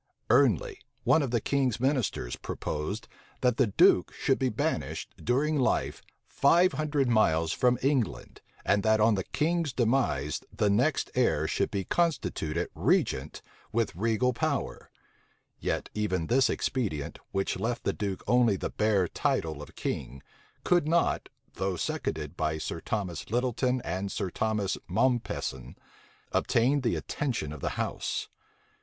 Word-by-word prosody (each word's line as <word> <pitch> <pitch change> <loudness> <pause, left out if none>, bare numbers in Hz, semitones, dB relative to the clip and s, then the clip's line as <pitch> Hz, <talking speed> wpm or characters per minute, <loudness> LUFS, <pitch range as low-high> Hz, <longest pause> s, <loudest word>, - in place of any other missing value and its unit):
Ernley, 450 -5 +3 0.2
one 160 - +4
of 140 - -1
the 120 0 +1
king's 130 -2 0
ministers, 130 - 0
proposed, 100 +10 -4 0.3
that 125 -2 +2
the 130 - +4
duke 100 - +4
should - - +1
be - - +1
banished, - - -2
during 145 +5 +1
life, 130 - 0 0.3
five 175 +6 +4
hundred 150 -3 0
miles 80 -9 +3
from 125 0 +3
England 135 -6 -1 0.2
and 100 0 +3
that 110 +1 +3
on 110 +1 +5
the 95 -2 -1
king's 165 -1 0
demise 110 - +1
the 105 -1 +1
next 125 +8 +1
heir 80 -11 +2
should - - 0
be 100 - -2
constituted 90 - 0
regent 70 +3 0 0.3
with 115 -5 0
regal 115 +5 +1
power: - - -2 0.7
yet - - -2
even 95 -6 -1
this 130 +7 +3
expedient, 95 - -2
which 95 -1 -1
left 120 +4 -2
the - - 0
duke 100 -3 -3
only 120 -4 +4
the - - -4
bare 105 -4 +2
title 80 -2 -1
of - - -11
king, 65 +1 -4 0.4
could 175 -4 +3
not, 170 +2 +1 0.2
though 95 0 -2
seconded 75 -2 -3
by 80 -1 -1
Sir 80 - -4
Thomas 95 -7 -3
Lyttleton 125 +2 0
and 95 +3 -3
Sir 95 -4 -3
Thomas 105 -2 -1
Mompesson, 110 - -1 0.6
obtain 130 +5 +2
the 120 - +1
attention 120 - -3
of 75 - -9
the - - -1
house. - - -2
110 Hz, 140 wpm, -29 LUFS, 90-130 Hz, 0.7 s, on